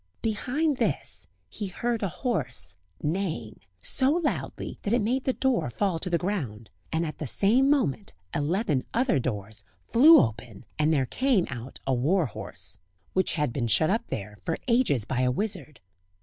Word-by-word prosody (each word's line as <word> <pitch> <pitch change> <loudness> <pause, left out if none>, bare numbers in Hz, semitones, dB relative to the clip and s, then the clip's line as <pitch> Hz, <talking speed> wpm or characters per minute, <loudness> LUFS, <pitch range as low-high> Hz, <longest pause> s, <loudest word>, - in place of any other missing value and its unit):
Behind 260 +7 0
this - - -1 0.2
he 205 - -5
heard 235 +5 -2
a 200 - 0
horse 130 - -2 0.3
neighing, 160 - -2 0.2
so 265 0 +3
loudly 320 0 -2
that 205 - -1
it 240 - +4
made 255 +5 0
the 260 - +3
door 250 - +1
fall 180 - 0
to 180 - -3
the 170 - +2
ground, 135 - -3 0.2
and 160 +1 0
at 155 - -6
the 150 - -3
same 235 - +3
moment 230 - +1 0.2
eleven 150 - 0
other 240 - +3
doors 105 -3 -4 0.2
flew 300 +8 +8
open 110 -2 -2
and 155 +1 +3
there 140 -4 +2
came 250 - +2
out 120 +2 -7
a 135 - +1
war 155 +9 +2
horse, 115 - -5 0.3
which 185 -1 +1
had 150 -7 0
been 120 -2 -1
shut 155 +9 +4
up 225 +3 0
there 105 0 -6
for 165 - -2
ages 230 - +3
by 125 +2 -2
a 125 - +3
wizard. 155 - -2
170 Hz, 170 wpm, -27 LUFS, -, 0.3 s, flew